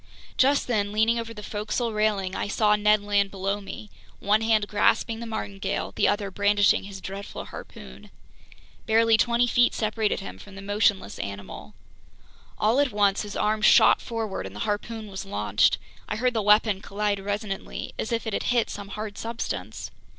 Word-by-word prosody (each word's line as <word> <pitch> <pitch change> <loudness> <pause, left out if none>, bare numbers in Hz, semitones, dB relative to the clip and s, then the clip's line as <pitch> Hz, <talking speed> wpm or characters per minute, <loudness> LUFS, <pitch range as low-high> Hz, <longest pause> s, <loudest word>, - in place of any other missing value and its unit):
Just 275 +2 +3
then, 205 -4 0
leaning 220 +2 +2
over 230 0 -5
the 210 -2 -9
forecastle 215 +3 -2
railing, 210 -3 0
I - - -2
saw 210 0 +3
Ned 210 0 +3
Land 205 -1 +2
below 195 +1 -2
me, 205 +1 -9 0.3
one 210 +2 +2
hand 220 -2 +2
grasping 225 +2 +1
the 235 - -6
martingale, 205 -3 -3
the - - +3
other 205 -2 0
brandishing 205 0 +3
his 195 -1 -9
dreadful 195 +2 -7
harpoon. 65 -1 -11 0.8
Barely 225 0 +5
twenty 235 +2 +3
feet 245 0 +3
separated 215 -1 0
him 90 +1 -8
from 195 - -13
the 195 - -8
motionless 205 - +1
animal. 100 -7 -7 0.8
All 220 +5 +2
at 285 -3 +2
once 200 -1 +2
his 205 -1 -7
arm 215 0 0
shot - - +6
forward 220 - -4
and 95 - -11
the 105 - -6
harpoon 215 +2 -3
was 195 -1 -6
launched. 105 - +2 0.3
I - - -1
heard 250 +3 +1
the 225 - 0
weapon 210 -1 +4
collide 205 0 -1
resonantly, 205 0 -4
as 220 - -3
if 230 0 -1
it 220 - -3
had - - 0
hit 240 -2 +1
some 205 0 -7
hard 210 +1 -6
substance. 230 +1 -5
210 Hz, 175 wpm, -26 LUFS, 200-225 Hz, 0.8 s, shot